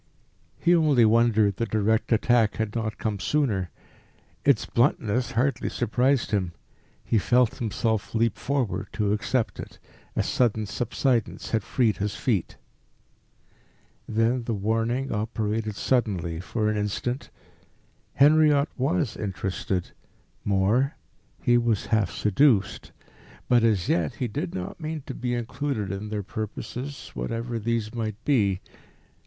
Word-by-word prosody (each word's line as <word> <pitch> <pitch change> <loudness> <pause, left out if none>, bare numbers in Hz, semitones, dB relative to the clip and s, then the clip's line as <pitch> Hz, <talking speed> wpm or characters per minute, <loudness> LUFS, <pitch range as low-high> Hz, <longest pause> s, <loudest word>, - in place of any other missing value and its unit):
He 175 - +3
only 150 -8 +4
wondered 110 -3 +3
the 115 - -1
direct 110 +2 +1
attack 115 -1 +3
had 110 -1 -2
not 110 -2 -2
come 105 -3 -2
sooner. 105 -8 0 0.7
Its 140 -6 +3
bluntness 120 -1 +1
hardly 130 +4 0
surprised 125 +2 +1
him. 95 -4 0 0.5
He 110 - +2
felt 125 +3 +2
himself 110 -1 -1
leap 115 0 +2
forward 125 -8 -1
to 105 -1 +1
accept 115 +3 -1
it. - - -8 0.4
A - - +1
sudden 110 -3 +1
subsidence 120 +2 -1
had 110 - +2
freed 110 +2 +1
his 105 +1 -2
feet. 105 -9 -1 1.5
Then 115 +2 +1
the 115 - -1
warning 115 +6 -1
operated 110 0 -2
suddenly 95 -10 0
for 105 +4 -2
an 105 0 +1
instant. 105 +5 -2 0.9
Henriot 150 0 +5
was 145 - 0
interested; 95 -2 -3 0.5
more, 105 +9 +2 0.5
he 120 0 +4
was 115 -4 0
half 105 -5 +3
seduced; 105 -1 +2 0.6
but, 120 -2 +4
as 105 -6 +2
yet, 80 -4 +1
he 125 - -2
did 100 -5 -4
not 90 - -5
mean 155 -2 -4
to - - -5
be 120 -1 -2
included 120 -3 -3
in 100 +2 -5
their 105 -1 -3
purposes, 125 +7 -6
whatever 115 0 -3
these 115 0 -1
might 110 -3 -3
be. 100 -10 +2
115 Hz, 130 wpm, -26 LUFS, 105-125 Hz, 1.5 s, Henriot